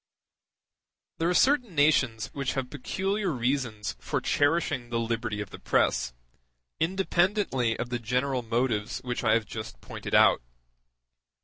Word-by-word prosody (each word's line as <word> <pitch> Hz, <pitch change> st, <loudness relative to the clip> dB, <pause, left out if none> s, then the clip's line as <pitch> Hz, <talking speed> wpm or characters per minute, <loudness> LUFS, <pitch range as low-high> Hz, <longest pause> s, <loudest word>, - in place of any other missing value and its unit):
There 165 Hz, +1 st, +2 dB
are -, -, +2 dB
certain 250 Hz, -, +3 dB
nations 130 Hz, -7 st, +2 dB
which 140 Hz, -2 st, -2 dB
have 135 Hz, -2 st, -3 dB
peculiar 195 Hz, +8 st, -2 dB
reasons 120 Hz, -, -1 dB
for -, -, -2 dB
cherishing 145 Hz, -4 st, +1 dB
the 115 Hz, -1 st, -1 dB
liberty 115 Hz, -2 st, -2 dB
of 100 Hz, -, -7 dB
the -, -, -9 dB
press, -, -, +1 dB, 0.7 s
independently 175 Hz, -, +1 dB
of 120 Hz, -, -4 dB
the 120 Hz, -1 st, -2 dB
general 125 Hz, +3 st, 0 dB
motives 115 Hz, -2 st, -1 dB
which 125 Hz, 0 st, -3 dB
I 110 Hz, -2 st, +4 dB
have 115 Hz, -1 st, 0 dB
just 110 Hz, -, -7 dB
pointed -, -, -4 dB
out. -, -, +6 dB
125 Hz, 135 wpm, -28 LUFS, 115-160 Hz, 0.7 s, out